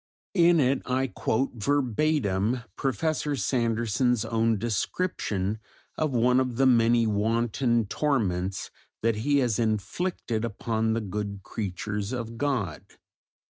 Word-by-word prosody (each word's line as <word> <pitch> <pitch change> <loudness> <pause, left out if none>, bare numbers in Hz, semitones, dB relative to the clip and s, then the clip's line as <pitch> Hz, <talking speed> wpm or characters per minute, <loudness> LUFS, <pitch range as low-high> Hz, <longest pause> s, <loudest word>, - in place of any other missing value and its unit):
In 175 -3 +5
it 135 -1 +2
I 130 +1 +1
quote 130 0 -1
verbatim 125 -2 +1
Professor 145 +3 -1
Sanderson's 120 -2 +1
own 115 -1 +1
description 105 - -1 0.4
of 155 - 0
one 125 0 +3
of 125 -2 -1
the 135 +3 +3
many 115 -2 +4
wanton 115 +2 +1
torments 100 -8 -1 0.3
that 115 -1 +2
he 145 +6 +2
has 115 -3 0
inflicted 115 - -1
upon 110 0 -1
the 115 - 0
good 100 0 -4
creatures 105 +2 -4
of 115 -2 -5
God. 120 - -1
115 Hz, 115 wpm, -27 LUFS, 105-130 Hz, 0.4 s, In